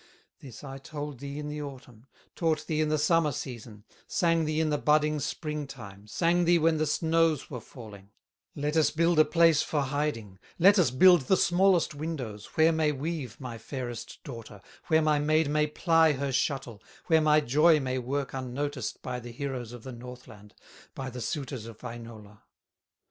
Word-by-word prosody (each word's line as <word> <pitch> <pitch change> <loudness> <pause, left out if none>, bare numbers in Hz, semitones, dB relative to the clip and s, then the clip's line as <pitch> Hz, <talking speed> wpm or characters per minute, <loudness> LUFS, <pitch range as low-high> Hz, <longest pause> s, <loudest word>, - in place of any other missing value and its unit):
"This 130 -2 -12
I 135 -1 -8
told 145 -1 -7
thee 140 +1 -6
in 150 0 -5
the 150 0 -5
autumn, 130 -4 -10 0.3
Taught 160 -3 0
thee 155 -1 -1
in 155 - +1
the 155 - +1
summer 155 0 +2
season, 115 -5 -8 0.2
Sang 165 -2 +1
thee 155 0 -1
in 160 -1 +1
the 150 - 0
budding 150 0 +2
spring 150 0 -4
time, 100 -6 -11
Sang 170 +9 +1
thee 175 +1 +5
when 165 0 +2
the 155 0 0
snows 160 -1 +1
were 125 -4 -5
falling: 105 -5 -12 0.5
'Let 145 +2 -2
us 160 -1 +4
build 165 +1 +2
a - - +9
place 165 -1 +4
for 150 - -1
hiding, 135 -9 -3 0.2
Let 195 +4 +6
us 165 -7 +4
build 150 +2 +5
the 190 - +4
smallest 180 -2 +3
windows, 140 -9 -5
Where 160 +1 +5
may 160 -2 +1
weave 145 -4 -5
my 120 -3 -7
fairest 120 -4 -7
daughter, 115 -6 -10 0.2
Where 160 -1 +3
my 150 -1 +2
maid 155 0 +2
may 150 0 +2
ply 165 0 +3
her 140 0 -2
shuttle, 130 -4 -2 0.2
Where 160 -2 +4
my 155 0 +5
joy 150 +4 +4
may 130 -1 -2
work 135 0 -3
unnoticed 130 0 -4
By 125 -1 -4
the 120 0 -9
heroes 125 -2 -5
of 120 -2 -10
the 130 - -7
Northland, 120 -4 -12 0.4
By 130 -1 -5
the 125 0 -7
suitors 130 -3 -4
of 115 -2 -10
Wainola. 115 -4 -10
145 Hz, 180 wpm, -28 LUFS, 125-155 Hz, 0.5 s, a